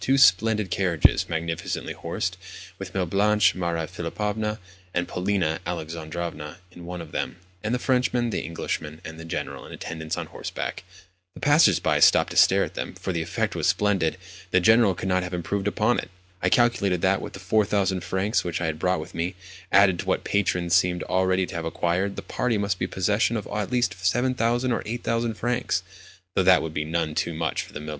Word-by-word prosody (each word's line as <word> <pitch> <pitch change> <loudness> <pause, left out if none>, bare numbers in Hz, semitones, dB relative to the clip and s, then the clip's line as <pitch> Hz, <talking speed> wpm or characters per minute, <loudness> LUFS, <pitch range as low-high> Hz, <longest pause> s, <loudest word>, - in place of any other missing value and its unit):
Two 135 +1 +2
splendid 105 -4 +4
carriages, 90 -6 +3
magnificently 80 0 -3
horsed, 90 +1 -3 0.4
with 95 -1 -8
Mlle. 95 -2 +1
Blanche, 100 +1 +3
Maria 85 -3 -2
Philipovna, 105 +6 -3 0.4
and 90 0 0
Polina 90 -4 0
Alexandrovna 80 -1 -5
in 85 -1 -11
one 90 -1 -5
of 80 -2 -10
them, - - -3 0.3
and 110 - -1
the 125 - +2
Frenchman, 125 -2 +1
the - - -1
Englishman, 80 -1 -4
and 80 0 -8
the 80 - -8
General 80 - -4
in - - -11
attendance 80 -1 -5
on - - -3
horseback! - - -5 0.5
The - - -10
passers 145 +3 +5
by - - +1
stopped - - +5
to - - -6
stare - - +6
at - - -5
them, - - -5
for 95 - -4
the 85 - -1
effect 80 +1 -2
was - - 0
splendid—the 95 -1 0
General 110 0 +5
could 95 - -4
not 90 0 +2
have 90 0 -4
improved 95 +4 -2
upon 110 +4 +2
it. - - -6 0.3
I 90 - +2
calculated 100 -6 +2
that, 95 +1 +3
with - - -7
the 95 - -8
4000 100 -2 +1
francs 100 +4 0
which 85 -2 -2
I 90 - -1
had 80 -1 -2
brought 90 -1 +1
with 90 +4 -10
me, 85 +3 -2 0.4
added 95 -3 +5
to - - -3
what - - +1
my - - -7
patrons 90 -3 +1
seemed 90 0 +3
already 95 0 +1
to 80 - -9
have 85 -1 -3
acquired, 90 +4 -1
the - - -6
party 125 -3 -1
must 100 -2 -1
be - - 0
in - - -6
possession 105 +5 +1
of 105 - -4
at 105 -2 -2
least 120 -7 0
7000 120 +4 +1
or 115 - 0
8000 115 0 -2
francs—though 95 -6 -3
that 95 0 +5
would 80 -1 -5
be 75 -1 -2
none 80 -1 -1
too 85 +2 -1
much 80 -2 -1
for - - -8
Mlle. 75 +1 -7
95 Hz, 200 wpm, -25 LUFS, 85-105 Hz, 0.5 s, stare